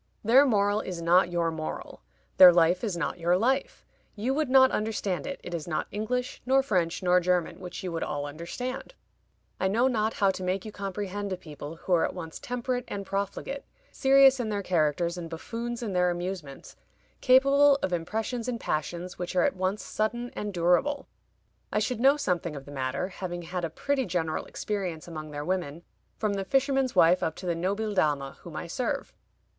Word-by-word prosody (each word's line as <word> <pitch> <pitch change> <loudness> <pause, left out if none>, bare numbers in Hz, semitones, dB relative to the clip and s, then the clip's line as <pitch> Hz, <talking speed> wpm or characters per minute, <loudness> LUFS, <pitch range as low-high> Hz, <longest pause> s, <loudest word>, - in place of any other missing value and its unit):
Their 255 +6 +6
moral 205 -2 +2
is 180 -2 -5
not 175 +2 +4
your 170 -1 0
moral; 155 -1 -6 0.4
their 185 -1 +11
life 175 +2 +3
is 200 -6 -1
not 170 - -2
your 175 +2 +3
life; 270 - 0 0.3
you 235 +5 -1
would 300 -1 0
not 260 0 +6
understand 210 -4 -2
it; 275 - -5
it 175 - -7
is 165 -2 -4
not 155 - -1
English, 250 +4 -3
nor 270 +1 +3
French, 180 -7 0
nor 180 0 +5
German, 180 0 0
which 180 +1 -7
you 180 - -3
would 165 - -3
all 145 -1 -2
understand. 175 - -6 0.6
I 190 - +2
know 230 +7 +3
not 220 -3 0
how 200 -2 +3
to 190 - -7
make 185 +2 -1
you 215 - -6
comprehend 200 0 -4
a 185 - -2
people 150 -2 -9
who 180 +2 -2
are 170 - +4
at - - -2
once 165 -3 -7
temperate 245 0 -3
and 200 -1 -5
profligate, 200 +8 -3 0.3
serious 270 0 +5
in 230 -3 -1
their 205 -1 -2
characters 170 0 +1
and 165 -1 -6
buffoons 235 +8 -5
in 210 -4 -3
their 180 0 +3
amusements, 175 -5 -5 0.5
capable 275 +2 +6
of 180 - 0
impressions 220 +8 -2
and 240 -2 -2
passions 175 +3 -3
which 180 +1 -4
are 180 - +4
at - - +1
once 190 +3 -1
sudden 240 +3 -2
and 210 0 -3
durable. 180 +11 +1 0.7
I - - 0
should 220 +2 0
know 275 +4 +5
something 175 - -1
of 140 -1 -8
the 145 - -11
matter, 135 +6 -2
having 175 -2 -5
had 175 +1 -4
a 165 - -1
pretty 265 - -1
general 165 -3 -1
experience 185 -7 -4
among 155 -2 -7
their 145 0 -5
women, 175 -3 -2 0.3
from 210 -2 0
the 195 -1 -2
fisherman's 270 +2 +1
wife 175 +3 +5
up 160 - -1
to - - -9
the 175 - +1
Nobil 200 +5 -1
Dama 145 -7 0
whom 170 -3 -10
I - - -4
serve. 235 +9 -3
190 Hz, 195 wpm, -28 LUFS, 170-235 Hz, 0.7 s, their